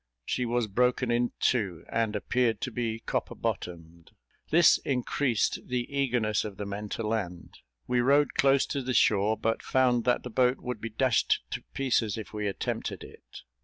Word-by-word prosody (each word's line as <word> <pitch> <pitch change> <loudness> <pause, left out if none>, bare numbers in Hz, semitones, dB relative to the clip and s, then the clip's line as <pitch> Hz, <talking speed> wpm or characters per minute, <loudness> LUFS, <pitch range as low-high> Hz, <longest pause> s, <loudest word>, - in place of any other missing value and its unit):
She 125 -1 -1
was 120 0 +1
broken 125 +3 +1
in 120 0 +1
two, 100 -9 0
and 115 -2 -1
appeared 115 +1 0
to 130 - -3
be 115 -1 -3
copper - - -3
bottomed. 85 -1 -5 0.4
This 165 +1 +6
increased 125 -2 0
the 125 -1 -1
eagerness 120 -6 +1
of 105 -3 -7
the 105 - -4
men 100 +1 -5
to 115 - -3
land; 100 -6 -4 0.3
we 125 0 +1
rowed 140 +4 +3
close 135 0 +3
to 140 - -3
the 130 0 -2
shore, 105 +1 +3
but 115 +1 -1
found 125 -3 +2
that 125 -1 +2
the 125 - -7
boat 125 +2 +3
would 125 -4 -5
be 115 - -4
dashed 120 +2 +1
to - - -3
pieces 120 -6 +1
if 110 - -8
we 105 -1 -2
attempted 100 - -3
it. - - -13
120 Hz, 175 wpm, -28 LUFS, 105-125 Hz, 0.4 s, This